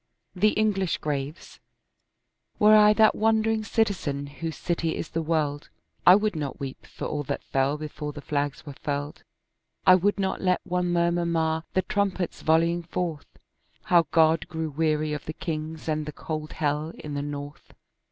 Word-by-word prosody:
THE 210 +4 +2
ENGLISH 195 -5 +1
GRAVES 145 +2 -5 1.0
Were 215 +1 +7
I 210 0 +7
that 220 0 +5
wandering 220 0 +2
citizen 190 -11 0
whose 155 +3 -6
city 165 -2 -1
is - - -5
the 165 - -2
world, 155 -3 -1 0.4
I 180 - +11
would 210 -1 +1
not 145 -3 -4
weep 135 -1 -7
for - - -7
all 150 - -2
that - - -3
fell 135 +2 0
before 150 0 -5
the 145 - -9
flags 145 -1 -2
were 145 - -7
furled; 145 +2 -4 0.6
I 185 - +9
would 195 +3 +3
not 190 -1 -1
let 185 -1 +2
one 180 0 -1
murmur 170 0 +1
mar 160 -1 0
the 185 - +3
trumpets 190 -2 -1
volleying 165 +2 +2
forth 170 -2 -4 0.6
How 170 -3 +4
God 160 0 +3
grew 160 -1 -4
weary 155 0 0
of 150 - -5
the 155 - -5
kings, 160 -1 -5
and 155 -1 -1
the - - -3
cold 155 0 -5
hell 150 +2 -1
in 150 - -7
the 145 - -2
north. 145 0 -7
160 Hz, 170 wpm, -26 LUFS, 150-180 Hz, 1.0 s, I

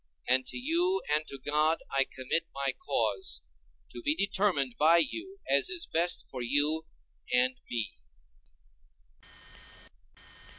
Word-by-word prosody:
And 130 +1 +3
to - - -5
you 345 +8 +2
and 155 +1 +2
to 140 - -6
God 150 +4 +1
I 135 0 +3
commit 130 +5 -1
my 140 0 -1
cause, 380 - -1 0.5
to - - -8
be 300 -2 +1
determined 195 - +1
by 160 +3 +6
you 340 - 0
as - - +4
is 360 -2 -2
best 170 +2 +1
for 130 - -7
you 145 +6 +1 0.4
and 125 +1 +3
me. 115 -3 -2
155 Hz, 125 wpm, -29 LUFS, -, 0.5 s, by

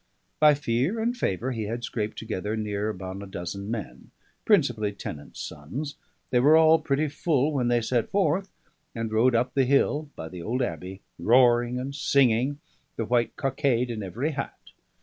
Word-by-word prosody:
By 150 -1 +7
fear 140 - 0
and 235 +2 0
favour 125 - -1
he 110 -3 -3
had 115 +3 -4
scraped 110 -2 -3
together 110 -1 -3
near 105 -1 -2
upon 95 -1 -6
a 100 - -8
dozen 95 +2 -6
men, 110 -5 -6 0.4
principally 120 - +2
tenants' 75 -7 -8
sons; 130 - -6 0.4
they 125 - +4
were 150 +5 +6
all 160 0 +6
pretty 145 +3 0
full 145 -1 +1
when 130 -4 +1
they 120 -1 +2
set 120 0 0
forth, 190 -1 +1 0.5
and 115 -1 -3
rode 120 +3 +4
up 125 +2 +1
the 135 -2 +3
hill 145 +3 +2
by 80 - -6
the 90 +1 -8
old 125 +8 -1
abbey, 95 -4 -5 0.2
roaring 120 0 +4
and 135 +2 -4
singing, 140 -1 +2 0.4
the 115 - -2
white 120 0 +1
cockade 130 -3 0
in 110 -2 -4
every 115 - -2
hat. 145 - -7
120 Hz, 170 wpm, -26 LUFS, 110-140 Hz, 0.5 s, By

